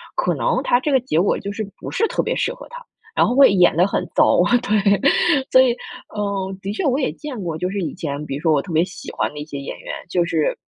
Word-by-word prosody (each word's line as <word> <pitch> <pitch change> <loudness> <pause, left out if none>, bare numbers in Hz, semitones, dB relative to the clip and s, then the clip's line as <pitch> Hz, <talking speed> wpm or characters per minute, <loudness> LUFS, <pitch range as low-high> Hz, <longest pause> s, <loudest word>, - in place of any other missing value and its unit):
可 - - 0
能 - - 0
它 245 - +2
这 295 - -1
个 265 - +4
结 240 -10 -1
果 195 - +1
就 200 - -6
是 215 +1 -4
不 - - -7
是 450 - +1
特 - - 0
别 - - -2
适 - - -1
合 - - -12
他， - - -10 0.3
然 - - +4
后 245 - 0
会 275 -7 +7
演 180 -4 +4
得 180 +3 +4
很 - - -2
糟， - - +4 0.2
对。 205 -4 +2 0.5
所 260 - +6
以， 260 -2 +4 0.5
嗯， 195 -2 -2
的 200 +1 -4
确 220 - -3
我 270 -1 +2
也 265 - 0
见 290 -6 -7
过， 165 -4 -4
就 180 +3 -2
是 200 +1 -3
以 175 - -3
前 145 -1 -4
比 135 - -4
如 145 - -6
说 160 -1 +2
我 145 -2 +3
特 170 - -8
别 160 +1 +4
喜 180 - -8
欢 - - -1
的 150 - -8
一 150 - -6
些 150 -2 -7
演 140 - -7
员， - - -7 0.2
就 175 -1 +1
是 160 -3 0
195 Hz, 290 characters per minute, -20 LUFS, 165-245 Hz, 0.5 s, 会